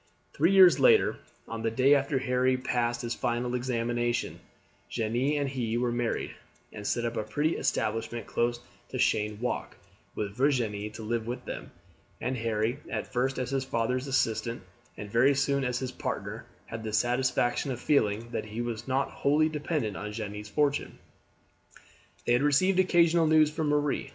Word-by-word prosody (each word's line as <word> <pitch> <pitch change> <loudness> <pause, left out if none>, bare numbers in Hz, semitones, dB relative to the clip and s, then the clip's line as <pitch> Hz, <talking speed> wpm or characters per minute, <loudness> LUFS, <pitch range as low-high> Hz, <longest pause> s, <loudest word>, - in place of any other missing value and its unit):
Three 165 +6 +3
years 190 -3 +7
later, 455 -3 +5 0.3
on 115 0 -5
the 115 - +1
day 130 +5 +4
after 140 0 +2
Harry 130 0 +1
passed 120 -1 -1
his 120 0 -2
final 120 +1 -1
examination, 120 -1 -1 0.5
Jeanne 120 +6 0
and 140 - 0
he 120 -4 -2
were 120 0 0
married, 120 -1 -1 0.4
and 105 -1 -6
set 120 - 0
up 115 0 -3
a - - 0
pretty 150 +9 0
establishment 115 +2 -1
close 120 0 0 0.3
to - - -5
Cheyne 105 0 +1
Walk, 125 +1 -3 0.4
with 100 -1 -3
Virginie 115 -6 0
to 110 - -8
live 115 +1 -2
with 120 +1 -5
them; - - -6 0.5
and 130 - -2
Harry, 115 +3 -1
at - - -4
first 130 +2 0
as 125 0 -2
his 135 -1 0
father's 125 +1 -1
assistant, 115 -4 0 0.3
and 105 -1 -7
very 130 +5 +4
soon 140 0 +1
as 125 -1 -1
his 130 0 -3
partner, - - -5 0.2
had 115 0 -7
the 110 -1 -4
satisfaction 120 +2 +1
of 125 -3 -3
feeling 115 -4 +1
that - - -3
he 110 +2 -7
was 120 0 -4
not 135 +1 0
wholly 150 +3 +2
dependent 150 - -2
on 105 +2 -5
Jeanne's 105 -1 -6
fortune. 145 +4 0 1.3
They 120 - +3
had 120 - +3
received 165 +7 +3
occasional 170 -3 +4
news 155 -1 +5
from 155 0 -2
Marie. 145 -1 0
125 Hz, 170 wpm, -28 LUFS, 115-140 Hz, 1.3 s, years